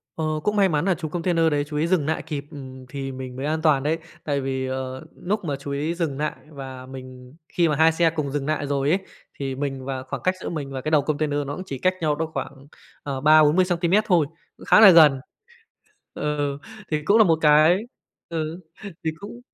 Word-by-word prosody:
Ờ, 160 - -2 0.2
cũng 210 - 0
may 200 -2 +4
mắn 150 0 0
là 190 -2 +2
chú 160 -2 -5
container 165 -1 +1
đấy 145 -1 +1
chú 150 - -5
ý 155 +2 +1
dừng 170 -5 +1
lại 160 +1 -1
kịp, 150 -3 -5
ừm, 130 -3 -10
thì 135 0 -5
mình 130 -1 -7
mới 135 +2 -4
an 155 +1 -1
toàn 150 -4 +3
đấy. 155 +3 +1 0.3
Tại 140 -2 -1
vì, 130 0 -2
ờ, 130 +2 -5 0.2
lúc 205 0 -1
mà 145 -3 -1
chú 140 - -7
ý 150 +4 -2
dừng 165 -6 -2
lại 150 +1 -1 0.2
và 135 -3 -9
mình 130 -1 -11 0.2
khi 170 -1 +2
mà 150 - +1
2 160 +2 +5
xe 165 +1 +2
cùng 145 -3 -2
dừng 140 -1 -2
lại 155 -2 -1
rồi 140 0 0
ấy, 180 +5 +3 0.4
thì 135 -1 -3
mình 135 -1 -4
và 130 -1 -4
khoảng 130 - -6
cách 185 0 +1
giữa - - -4
mình 145 -5 -5
và 135 -1 -4
cái 155 - -3
đầu 155 -2 +5
container 145 0 -1
nó 145 - -4
cũng 185 - -6
chỉ 140 -7 -5
cách 185 +6 +2
nhau 150 -2 +1
đó 160 +2 -2
khoảng, 135 0 -6 0.4
ờ, 135 -2 -4
30-40 155 +4 +5
xăng-ti-mét 180 +3 +2
thôi, 175 -6 +4 0.3
cũng - - -13
khá - - +6
là 215 -2 +10
gần 155 -6 +7 1.0
ờ, 145 -1 -2 0.3
thì 155 -1 -1
cũng 205 +6 +4
là 220 - +7
một 165 -4 +3
cái 155 +3 +5 0.5
ừ, 165 +1 -4 0.4
thì 160 - +1
cũng 210 +4 -9
150 Hz, 230 wpm, -23 LUFS, 135-165 Hz, 1.0 s, là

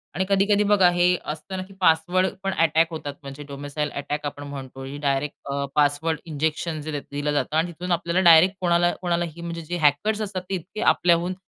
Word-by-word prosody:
आणि 190 +3 0
कधी-कधी 200 +1 +3
बघा 200 -3 +5
हे 175 +1 +3
असतं 155 +5 -5
ना, 185 - -3
की 195 +1 -15
पासवर्ड 175 +2 +3 0.2
पण 195 0 -1
अटॅक 165 -1 +3
होतात, 150 -3 -5
म्हणजे 140 +1 -8
डोमिसाईल 145 +1 -4
अटॅक 145 +1 -4
आपण 145 0 -5
म्हणतो 135 -1 -8 0.2
डायरेक्ट 140 0 -1 0.2
अ, 140 0 -1
पासवर्ड 150 +2 +1
इंजेक्शन 160 +1 -2
जे 155 +2 -5
दि 145 - -2
दिलं 145 +1 -2
जातं 145 +1 0
आणि 170 +2 +1
तिथून 180 +2 -6
आपल्याला 170 +1 +1
डायरेक्ट 170 +4 +7
कोणाला, 175 0 +3
कोणालाही 170 -2 -2
म्हणजे 170 0 -5
जे 175 +2 -4
हॅकर्स 170 +8 +2
असतात, 195 -3 -3
ते 195 - 0
इतके 185 +4 -7
आपल्याहून 175 +1 +2
165 Hz, 195 wpm, -24 LUFS, 145-180 Hz, 0.2 s, डायरेक्ट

